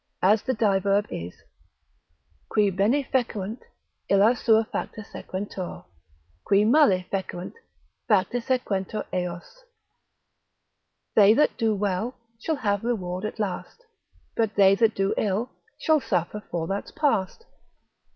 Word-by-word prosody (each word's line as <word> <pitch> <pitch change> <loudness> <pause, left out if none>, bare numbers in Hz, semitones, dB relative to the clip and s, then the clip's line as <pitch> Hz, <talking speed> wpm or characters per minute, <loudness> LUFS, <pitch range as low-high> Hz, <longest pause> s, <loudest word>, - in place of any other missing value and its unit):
As 205 +3 +5
the 260 - -1
diverb 200 -1 +2
is, 85 +1 -7 1.1
Qui 205 -2 +2
bene 210 +10 +2
fecerunt, 230 -4 -2 0.5
illi 200 +4 +5
sua 225 -2 +3
facta 215 - -5
sequentur; 190 -2 -6 0.6
Qui 200 +1 +3
male 215 -8 +4
fecerunt, 185 -2 -4 0.5
facta 210 +3 +2
sequentur 215 -5 -2
eos: 180 - -5 1.5
They 210 +1 +6
that 300 - +3
do 220 -2 +1
well, 205 +4 -2 0.2
shall 315 +7 -1
have 205 -6 -1
reward 190 -5 -2
at 215 - -5
last: 205 - -4 0.5
But 220 -2 0
they 195 -1 +6
that 220 0 +2 0.2
ill, 215 +4 -1 0.3
shall 310 -2 +3
suffer 180 +2 -2
for 170 -2 -2
that's 195 +4 -3
past. 285 - -1
205 Hz, 115 wpm, -25 LUFS, 190-230 Hz, 1.5 s, They